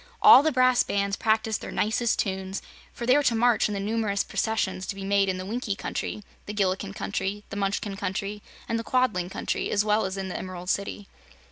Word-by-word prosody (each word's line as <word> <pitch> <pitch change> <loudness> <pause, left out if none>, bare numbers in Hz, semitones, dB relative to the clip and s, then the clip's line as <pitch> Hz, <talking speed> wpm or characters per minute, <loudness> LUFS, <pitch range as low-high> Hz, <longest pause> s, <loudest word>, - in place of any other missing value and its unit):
All - - +9
the 315 +2 +1
brass 255 -1 +4
bands 200 0 0
practiced 220 0 0
their - - -6
nicest 220 +2 +1
tunes, 190 -1 -2 0.3
for 235 - -6
they 255 +2 +5
were 290 - +4
to 250 -5 +2
march 235 -1 +3
in 210 - -3
the - - -2
numerous 205 -1 0
processions 205 -4 -1
to - - -3
be 195 - -7
made 200 0 +2
in 185 - -1
the 185 - -5
Winkie 220 0 -2
Country, 210 - -4 0.2
the 210 - -5
Gillikin 195 0 -1
Country, 200 +1 -3
the - - -5
Munchkin 200 0 -1
Country 200 +2 -3 0.3
and 230 - -1
the - - -4
Quadling 225 -9 +1
Country, - - -2
as 210 0 +1
well 210 0 +2
as 190 +1 -5
in 190 -1 -3
the 185 - -5
Emerald 180 -1 -4
City. 200 0 -3
205 Hz, 215 wpm, -26 LUFS, 195-225 Hz, 0.3 s, All